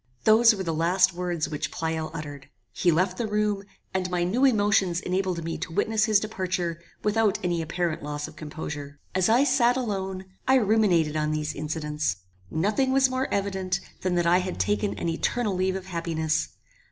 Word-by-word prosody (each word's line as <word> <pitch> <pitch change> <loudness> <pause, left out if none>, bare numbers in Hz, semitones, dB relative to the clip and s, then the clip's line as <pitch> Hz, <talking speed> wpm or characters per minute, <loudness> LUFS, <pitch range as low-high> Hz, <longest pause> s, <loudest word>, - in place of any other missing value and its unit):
Those 225 +1 +6
were 190 - -4
the 165 -2 -2
last 180 +3 +3
words 175 -2 -2
which 150 - -3
Pleyel 160 -1 -3
uttered. 145 -4 -8 0.2
He 175 - +2
left 180 +3 +1
the 230 - 0
room, 210 -1 0 0.3
and 185 -1 -1
my 180 -1 0
new 215 +10 +1
emotions 205 -7 +3
enabled 180 -2 -1
me 165 0 -4
to - - -5
witness 215 +5 +1
his 215 -3 +4
departure 185 -5 -3 0.2
without 210 -1 +2
any 175 -2 0
apparent 165 0 -2
loss 150 0 -4
of 155 - -13
composure. 150 -2 -7
As 185 +2 +2
I 240 +5 +5
sat 255 -3 +3
alone, 190 -6 -3 0.2
I 265 - +5
ruminated 200 - +3
on 150 0 0
these 155 0 -2
incidents. 150 - -2 0.3
Nothing 210 - +1
was 265 -1 +4
more 260 +1 -1
evident 190 -2 -1 0.2
than 185 -1 0
that 175 -1 +1
I 175 +2 +5
had 185 0 -4
taken 205 0 0
an - - -3
eternal 205 +6 0
leave 185 +1 0
of 190 -1 -5
happiness. 160 -3 -1
185 Hz, 180 wpm, -26 LUFS, 160-210 Hz, 0.3 s, Those